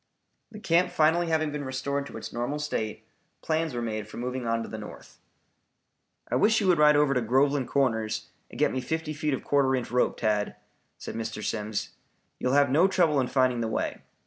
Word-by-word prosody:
The 215 Hz, -2 st, -10 dB
camp 180 Hz, -3 st, +2 dB
finally 170 Hz, +1 st, +3 dB
having 155 Hz, -2 st, +1 dB
been 145 Hz, 0 st, -4 dB
restored 140 Hz, +1 st, -3 dB
to -, -, -9 dB
its -, -, -8 dB
normal 120 Hz, +5 st, -2 dB
state, 115 Hz, -8 st, -3 dB, 0.4 s
plans 160 Hz, -3 st, -1 dB
were 120 Hz, -, -2 dB
made 110 Hz, -2 st, -3 dB
for -, -, -10 dB
moving 125 Hz, 0 st, -3 dB
on 115 Hz, 0 st, 0 dB
to -, -, -7 dB
the 110 Hz, -, -7 dB
north. 105 Hz, -, -11 dB, 1.1 s
"I -, -, -1 dB
wish 220 Hz, +1 st, +4 dB
you 205 Hz, -, -1 dB
would 175 Hz, -3 st, +4 dB
ride 150 Hz, 0 st, +6 dB
over 145 Hz, -1 st, +3 dB
to 125 Hz, -, +1 dB
Groveland 135 Hz, +3 st, +2 dB
Corners 115 Hz, -6 st, 0 dB, 0.2 s
and -, -, -11 dB
get -, -, +2 dB
me 130 Hz, -, -2 dB
fifty 160 Hz, +3 st, -3 dB
feet 150 Hz, -1 st, -1 dB
of -, -, -8 dB
quarter 135 Hz, -2 st, +2 dB
inch 125 Hz, -3 st, -4 dB
rope, 125 Hz, 0 st, +1 dB
Tad," 105 Hz, -2 st, 0 dB, 0.4 s
said -, -, -7 dB
Mr. 110 Hz, -1 st, -5 dB
Simms. 105 Hz, 0 st, -3 dB, 0.5 s
"You -, -, -1 dB
will 130 Hz, -, +2 dB
have 140 Hz, -1 st, +4 dB
no 165 Hz, +7 st, +5 dB
trouble 170 Hz, -6 st, +2 dB
in 130 Hz, -, +1 dB
finding 130 Hz, -3 st, +2 dB
the 115 Hz, -, -1 dB
way. 110 Hz, -, -2 dB
135 Hz, 210 wpm, -27 LUFS, 115-155 Hz, 1.1 s, ride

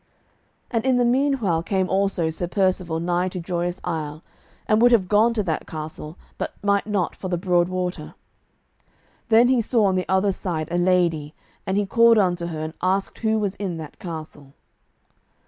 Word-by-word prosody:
And 230 Hz, -2 st, 0 dB
in 260 Hz, -1 st, +2 dB
the 245 Hz, -, +3 dB
meanwhile 245 Hz, -, +1 dB
came 190 Hz, +1 st, 0 dB
also 190 Hz, -4 st, 0 dB
Sir 175 Hz, +2 st, -3 dB
Percivale 185 Hz, -3 st, 0 dB
nigh 175 Hz, +2 st, 0 dB
to 180 Hz, -, -6 dB
Joyous 175 Hz, 0 st, -3 dB
Isle, 155 Hz, -3 st, -4 dB, 0.4 s
and 215 Hz, +1 st, +3 dB
would 245 Hz, +1 st, +6 dB
have 210 Hz, -6 st, +3 dB
gone 215 Hz, +4 st, +4 dB
to 215 Hz, -, 0 dB
that 160 Hz, -4 st, -3 dB
castle, 155 Hz, 0 st, -7 dB, 0.2 s
but -, -, -4 dB
might 200 Hz, 0 st, +1 dB
not 200 Hz, -4 st, -1 dB
for 185 Hz, -, -6 dB
the 180 Hz, -1 st, -1 dB
broad 175 Hz, -1 st, +1 dB
water. 185 Hz, -1 st, -4 dB, 1.1 s
Then 230 Hz, +2 st, +6 dB
he 255 Hz, -2 st, +3 dB
saw 225 Hz, -1 st, +2 dB
on 190 Hz, -1 st, +2 dB
the 185 Hz, -, -2 dB
other 190 Hz, +1 st, +2 dB
side 170 Hz, -5 st, -4 dB
a 175 Hz, -, 0 dB
lady, 170 Hz, -4 st, +1 dB, 0.3 s
and 190 Hz, +1 st, 0 dB
he 205 Hz, -, +1 dB
called 230 Hz, +3 st, +5 dB
unto 175 Hz, -4 st, +1 dB
her 160 Hz, -2 st, -5 dB
and 155 Hz, 0 st, -5 dB
asked 190 Hz, +2 st, -1 dB
who 220 Hz, -1 st, +1 dB
was 205 Hz, -3 st, -1 dB
in 185 Hz, -5 st, -3 dB
that 155 Hz, -2 st, -9 dB
castle. 155 Hz, -5 st, -8 dB
185 Hz, 180 wpm, -23 LUFS, 170-205 Hz, 1.1 s, would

